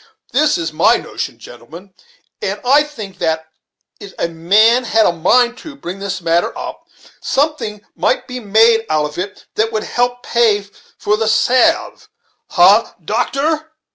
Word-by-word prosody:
This 300 +3 +2
is 165 -2 -4
my 155 - +4
notion, - - -6
gentlemen: 165 +11 -13 0.5
and - - -3
I 280 +4 +5
think 220 -11 -8
that 160 0 -2 0.5
it 200 - -11
a - - -1
man 210 +9 +3
had 225 -1 +3
a - - +3
mind 240 +9 +2
to 305 -3 -10
bring 195 -8 -7
this 195 -2 -4
matter 170 0 0
up, - - -8 0.3
something 255 -8 -2
might - - 0
be 250 -1 -6
made 225 +1 +3
out 155 -1 +1
of 150 +3 -7
it 195 +2 -6
that 225 +1 +1
would 215 -1 -2
help 245 0 -1
pay 220 -4 +2 0.3
for 210 +1 0
the 220 0 -1
salve 325 - +2 0.4
ha! 195 +5 +4
doctor!" 305 - -1
220 Hz, 155 wpm, -16 LUFS, 180-250 Hz, 0.5 s, I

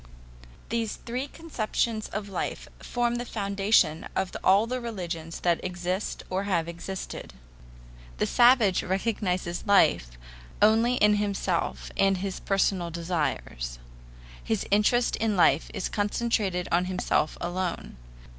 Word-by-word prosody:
These 230 -2 -1
three 250 +4 -4
conceptions 230 -8 -2
of 205 0 -4
life 195 - -4
form 240 -1 -1
the 240 - -3
foundation 200 -7 +1
of 190 -1 -1
all 195 +4 +5
the 250 +2 -3
religious 175 -8 -5
that 175 -1 +1
exist 180 +2 -3
or 190 +2 -2
have 170 -5 0
existed. 170 +3 -7 0.8
The - - +1
savage 240 -6 +5
recognizes 185 -3 -1
life - - +3 0.4
only 225 +4 +4
in 210 -3 +4
himself 200 -4 -1
and 195 -1 +3
his 190 0 -4
personal 195 -3 +1
desires. 155 - -3 0.7
His 220 -3 -1
interest 210 +4 +3
in 215 -3 0
life 165 -3 +4
is - - -2
concentrated 205 -3 0
on 175 +2 +3
himself 180 -4 0
alone. 175 0 -3
195 Hz, 120 wpm, -27 LUFS, 175-220 Hz, 0.8 s, all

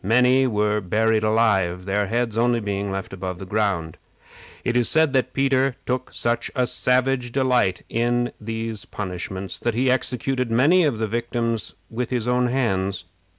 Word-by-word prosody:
Many 125 +5 +4
were 105 -2 +1
buried 110 +4 +1
alive, 105 -5 +1
their 100 +1 0
heads 115 0 -1
only 120 +1 +2
being 100 -2 -3
left 95 0 -5
above 95 -1 -5
the 95 - -8
ground. 95 -5 -1 0.6
It 120 - -1
is 120 -1 +3
said 160 -3 +3
that 130 -1 +1
Peter 135 -1 +1
took 125 0 -2
such 120 0 -1
a 125 -2 +2
savage 125 0 +1
delight 125 -8 +1
in 120 +1 0
these 115 0 -4
punishments, 95 0 -5
that 120 -2 -1
he 130 +2 +2
executed 130 0 -1
many 150 +10 +4
of 140 -7 0
the 110 0 -1
victims 115 0 -2
with 120 +1 -4
his 125 -2 -2
own 125 0 +2
hands. 100 -8 -1
115 Hz, 160 wpm, -23 LUFS, 105-125 Hz, 0.6 s, Many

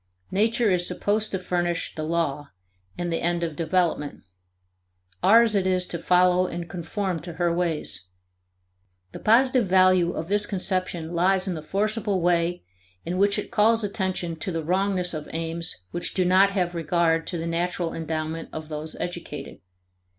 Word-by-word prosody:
Nature 220 +2 +2
is 175 -1 +2
supposed 210 +4 0
to 190 - -2
furnish 175 -2 -2
the 155 - -5
law 155 -3 -1 0.5
and 175 -1 -2
the - - -1
end 170 0 0
of 165 -3 -3
development; 165 -3 -1 1.0
ours 225 +3 +6
it 195 -2 +1
is 185 -1 +1
to 170 - -5
follow 180 +1 +3
and 170 -1 -5
conform 180 +1 -3
to 170 +2 -8
her 170 0 0
ways. 165 - -1 1.0
The - - -8
positive 250 0 +4
value 185 -1 +4
of 160 - -4
this 205 +2 +2
conception 185 -4 -2
lies 185 +2 +2
in 185 - -1
the 160 - -5
forcible 205 +3 -1
way 175 0 +1 0.4
in 180 +2 -2
which 200 +1 +3
it 210 - -5
calls 225 +2 +3
attention 185 -4 -2
to 185 - -4
the 165 -1 -3
wrongness 185 +1 0
of 155 -2 -6
aims 165 +1 -3 0.2
which 175 - -2
do 185 - +2
not 190 +2 +5
have 180 -3 -1
regard 165 0 +1
to 175 - -3
the 165 - -4
natural 170 0 -2
endowment 160 0 -4
of 155 0 -7
those 155 +1 -6
educated. 175 -1 -6
175 Hz, 165 wpm, -25 LUFS, 165-190 Hz, 1.0 s, ours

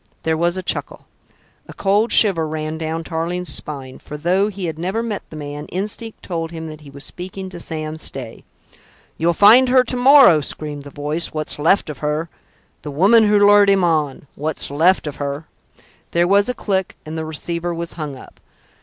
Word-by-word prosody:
There 160 0 +1
was 170 +3 0
a 185 - -4
chuckle. - - -3 0.6
A - - -10
cold 205 +4 +1
shiver 175 -7 +3
ran 155 0 -4
down 160 +1 -3
Tarling's 175 +2 -2
spine; 135 -3 -6
for, 150 - -8
though 180 +6 +2
he 195 -3 -5
had 160 -2 -4
never 190 +7 -2
met 215 -4 -3
the - - -10
man, 145 0 -7
instinct 210 +4 -5
told 165 -3 -3
him 160 -1 -7
that 155 0 -10
he 145 - -13
was 140 +1 -7
speaking 190 +1 -7
to 180 -2 -9
Sam 155 -1 -5
Stay. 130 -7 -5 0.8
"You'll 170 +1 +2
find 235 +7 +7
her 255 0 +5
to 250 - -2
morrow," 250 - +7
screamed 145 0 -5
the 145 - -10
voice, 150 +4 -2
"what's 155 -1 -3
left 170 +7 +3
of 150 -4 -7
her. 150 +2 -2 0.5
The 150 - -7
woman 200 +10 +5
who 210 0 +4
lured 205 0 +6
him 195 -2 +3
on... 155 -5 0
what's 155 -1 -2
left 165 +6 +3
of 150 - -5
her...." 145 +2 -4 0.7
There 170 +1 +3
was 200 +4 +3
a 250 - -2
click, 190 -4 -2
and 155 +1 -6
the 160 - -3
receiver 170 +2 -4
was 170 0 -5
hung 150 -4 -5
up. 130 - -14
165 Hz, 195 wpm, -20 LUFS, 155-195 Hz, 0.8 s, find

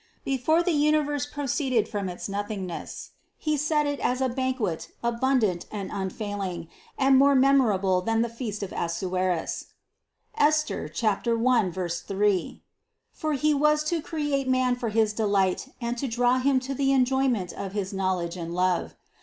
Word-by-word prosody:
Before 275 +6 +2
the 355 - +1
universe 295 -2 +1
proceeded 270 -6 0
from 205 -4 -3
its 180 - -6
nothingness, 200 -3 -5 0.3
He 305 -1 0
set 300 +1 +1
it 285 -1 -2
as 250 +1 0
a 260 -1 +1
banquet 255 -9 -2 0.2
abundant 235 -6 +1
and 200 -3 -5
un 190 -2 -2
failing, 190 -5 -5 0.3
and 270 0 +5
more 280 0 +5
memorable 220 -9 +3
than 225 +3 +1
the - - -1
feast 215 -4 -4
of 195 - -5
Assuerus 180 0 -2 0.7
(Esther 305 - +1 0.4
1, 230 -4 +2 0.4
3); 200 -2 0 0.5
for 310 -2 -2
He 300 +2 +2
was 300 +1 +3
to 325 +1 -1
create 295 -4 -2
man 255 -1 +2
for 245 -2 -3
his 215 0 +2
delight 200 -1 +1
and 235 -1 -2
to 275 - -1
draw 245 +2 +2
him 265 0 +3
to 265 +1 -4
the 275 0 +1
enjoyment 260 -7 +1
of 195 -1 -6
his 200 -2 -3
knowledge 185 -3 -1
and 170 0 -5
love. 180 -1 0
240 Hz, 155 wpm, -26 LUFS, 195-275 Hz, 0.7 s, and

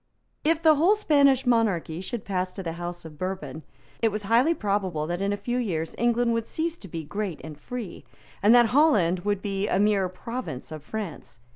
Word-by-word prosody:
If 325 +2 +1
the 315 -1 +7
whole 355 +8 +5
Spanish 280 -9 +3
monarchy 200 -9 +1
should 230 +3 -5
pass 185 -2 -1
to 195 - -6
the 165 - -3
House 175 0 -6
of 155 -2 -11
Bourbon, 185 -3 -4 0.4
it 225 -1 +3
was 210 0 -3
highly 240 +11 +3
probable 195 - -1
that 175 +3 -3
in 200 +1 0
a 205 - -1
few 240 +5 -2
years 165 -9 -2
England 240 0 +2
would 230 -1 -2
cease 330 +1 -2
to 195 - -10
be 165 -2 -5
great 200 +1 -4
and 160 -1 -8
free, 210 +4 -7 0.4
and 210 +4 +6
that 240 -2 +6
Holland 210 - +4
would 205 +1 -2
be 200 -1 -1
a - - +1
mere 200 -2 +2
province 185 - -6
of 155 -1 -6
France. 170 - -7
205 Hz, 200 wpm, -26 LUFS, 175-240 Hz, 0.4 s, the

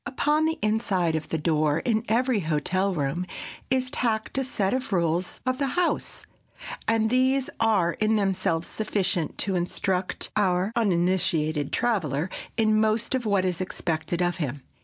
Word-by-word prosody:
Upon 295 +3 +1
the 320 +1 -1
inside 200 -6 +1
of 160 - -3
the 160 - 0
door 155 -1 +1
in 220 -2 +1
every 245 0 +2
hotel 185 +4 0
room 150 +5 -1 0.4
is 260 0 +1
tacked 220 -3 -1
a - - +1
set 205 -6 0
of 260 -2 -2
rules 170 -1 0
of 255 0 0
the 280 - +1
house, 360 -1 -1 0.6
and 225 0 +2
these 260 +1 +2
are 210 -7 +3
in 215 +1 +1
themselves 190 -5 0
sufficient 195 -6 -1
to 195 -2 -1
instruct 180 +1 -1
our 190 -1 +2
uninitiated 175 -7 +1
traveler 180 - 0 0.3
in 215 -1 +3
most 220 +3 +1
of 250 -4 -1
what 200 -2 +2
is 180 -1 -1
expected 170 -1 -2
of 175 +1 0
him. 140 -4 -3
195 Hz, 155 wpm, -26 LUFS, 170-225 Hz, 0.6 s, are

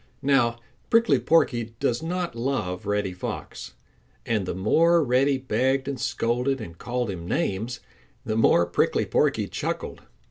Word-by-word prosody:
Now 130 -4 +3 0.3
Prickly 230 - +4
Porky 120 -4 +1
does 120 +2 0
not 175 +1 -3
love 115 -6 -2
Reddy 105 -2 0
Fox, 90 - -6 0.5
and 105 -5 -1
the - - -3
more 165 - +3
Reddy 135 +2 +2
begged 130 +2 0
and 140 -2 -4
scolded 125 +4 0
and 90 -7 -8
called 120 +2 -3
him 85 -2 -7
names, 110 +8 -2 0.4
the 110 - -1
more 85 -6 +4
Prickly 85 - +1
Porky - - +1
chuckled. - - -4
120 Hz, 140 wpm, -25 LUFS, 105-135 Hz, 0.5 s, Prickly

